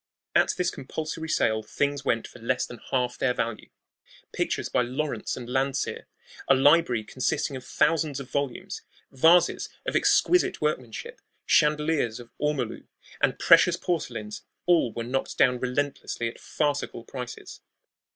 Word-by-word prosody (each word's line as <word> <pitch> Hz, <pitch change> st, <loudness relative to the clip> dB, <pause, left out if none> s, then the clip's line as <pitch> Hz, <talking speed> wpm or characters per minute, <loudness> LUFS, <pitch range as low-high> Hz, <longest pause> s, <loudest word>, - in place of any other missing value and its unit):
At -, -, +4 dB
this 180 Hz, -1 st, +1 dB
compulsory 160 Hz, +4 st, -5 dB
sale 110 Hz, -7 st, +2 dB
things 140 Hz, +5 st, -2 dB
went 115 Hz, -3 st, 0 dB
for -, -, -14 dB
less 125 Hz, +2 st, 0 dB
than 120 Hz, -, -10 dB
half 125 Hz, -1 st, 0 dB
their 125 Hz, -1 st, +1 dB
value. 115 Hz, -1 st, -3 dB, 0.6 s
Pictures -, -, -1 dB
by -, -, +1 dB
Lawrence 125 Hz, -1 st, -2 dB
and 120 Hz, -, -7 dB
Landseer, 135 Hz, +1 st, -1 dB, 0.4 s
a 135 Hz, -, +6 dB
library 135 Hz, -4 st, +4 dB
consisting 130 Hz, +4 st, -1 dB
of 130 Hz, -, -7 dB
thousands 155 Hz, -3 st, +1 dB
of 135 Hz, -, -7 dB
volumes, 140 Hz, -3 st, -3 dB, 0.3 s
vases 165 Hz, +6 st, +4 dB, 0.2 s
of -, -, -2 dB
exquisite 360 Hz, 0 st, +3 dB
workmanship, 130 Hz, -7 st, -3 dB, 0.2 s
chandeliers 150 Hz, -6 st, +2 dB
of 120 Hz, -1 st, -12 dB
ormolu, 145 Hz, -6 st, -2 dB, 0.3 s
and -, -, +2 dB
precious -, -, +6 dB
porcelains 210 Hz, +5 st, -3 dB, 0.2 s
all 170 Hz, -9 st, +3 dB
were 115 Hz, -, -4 dB
knocked 130 Hz, +3 st, -3 dB
down 125 Hz, -1 st, +4 dB
relentlessly 130 Hz, -2 st, -2 dB
at 115 Hz, -, -7 dB
farcical 145 Hz, -5 st, -2 dB
prices. 125 Hz, 0 st, -8 dB
135 Hz, 140 wpm, -26 LUFS, 120-150 Hz, 0.6 s, a